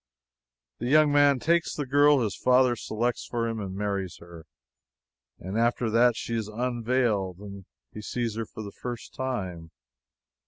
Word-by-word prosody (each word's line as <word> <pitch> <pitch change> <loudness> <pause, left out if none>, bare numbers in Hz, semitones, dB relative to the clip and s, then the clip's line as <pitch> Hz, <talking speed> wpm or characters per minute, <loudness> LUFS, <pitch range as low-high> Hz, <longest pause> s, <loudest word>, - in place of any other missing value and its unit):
The 120 - -3
young 150 +2 +5
man 145 -1 +5
takes 170 +5 +1
the 145 - -3
girl 145 +1 +4
his 105 -4 -1
father 125 -1 +3
selects 120 +2 -2
for 115 -1 -2
him, 115 -1 -3 0.2
marries 100 -3 -3
her, 85 -2 -13 0.9
and 95 +5 -4
after 120 -1 +1
that 120 +1 +4
she 115 - -5
is 110 -2 -2
unveiled, 115 -4 -1
and 100 -1 -10 0.3
he 105 - -7
sees 115 0 -3
her 115 -1 -4
for 110 - -8
the 100 - -7
first 120 +1 -7
time. 95 -11 -4
115 Hz, 155 wpm, -27 LUFS, 105-125 Hz, 0.9 s, young